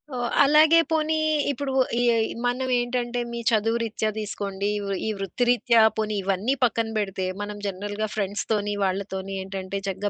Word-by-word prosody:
ఓహ్! 240 -1 -2
అలాగే 310 +3 +6
పోనీ 315 0 +1 0.3
ఇప్పుడూ, 275 0 -2 0.3
ఈ 245 - +2 0.4
మనవేంటంటే, 245 -1 0
మీ 235 - -3
చదువు 225 +1 +2
రీత్యా 220 -1 -1
దీసుకోండీ, 200 -1 -3 0.2
వు - - -4 0.2
ఈ - - 0
వృత్తిరీత్యా, 235 +4 +2 0.2
పోనీ 215 -1 -1
ఇవన్నీ 195 +6 0
పక్కన 230 -1 +2
బెడితే, 195 -3 -2 0.2
మనం 205 0 -5
జనరల్‌గా 205 +3 -3
ఫ్రెండ్స్‌తోని, 205 +1 -1
వాళ్ళతోని 190 0 -2
ఏంటంటే, 190 0 -5
చక్కగా 195 +2 -2
215 Hz, 135 wpm, -25 LUFS, 195-245 Hz, 0.4 s, అలాగే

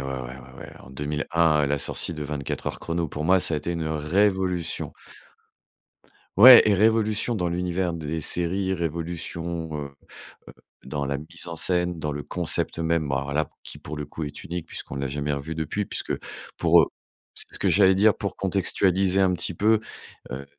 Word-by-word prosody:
ouais, 65 -1 -4
ouais, 65 +1 -10
ouais - - -10
en - - -14
2001, 75 +2 +1
la 70 +1 +1
sortie 85 - -1
de 75 - -5
24 70 -2 -4
Heures - - -3
chrono, 85 0 -2
pour 75 - -5
moi, 95 +4 +4
ça 85 -3 +1
été 80 +4 -3
une 85 -2 -3
révolution. 90 +2 0 1.4
Ouais 120 +2 +10
et 105 - +4
révolution 110 +2 +2
dans 90 -3 -1
l'univers 90 +1 -1
des 80 -1 -4
séries, 95 +4 0
révolution, 85 0 -4
heu 70 - -9 0.6
heu, - - -11 0.3
dans 70 +1 -3
la 70 0 -1
mise 80 +4 -9
en 85 - -5
scène, 90 0 0
dans 75 - -2
le 75 -1 -5
concept - - -1
même 80 -3 0
alors 70 +1 -2
là 75 0 0
qui, - - -7
pour 75 - -8
le 75 - -4
coup, 75 +2 -6
est 75 - -7
unique 85 -1 -5
puisqu'on - - -7
l'a 70 0 -2
jamais 75 +2 -2
revu 70 +3 -4
depuis 80 +6 -2
puisque - - -4 0.4
pour, - - +5
heu - - +1 0.5
c'est - - -3
ce - - +1
que - - +2
j'allais 95 -1 +5
dire, 105 +2 +4
pour 100 - -4
contextualiser 95 0 +1
un 95 -1 +3
petit 90 0 -2
peu, 110 +5 +3 0.5
heu, 65 +2 -6
85 Hz, 185 wpm, -25 LUFS, 75-95 Hz, 1.4 s, Ouais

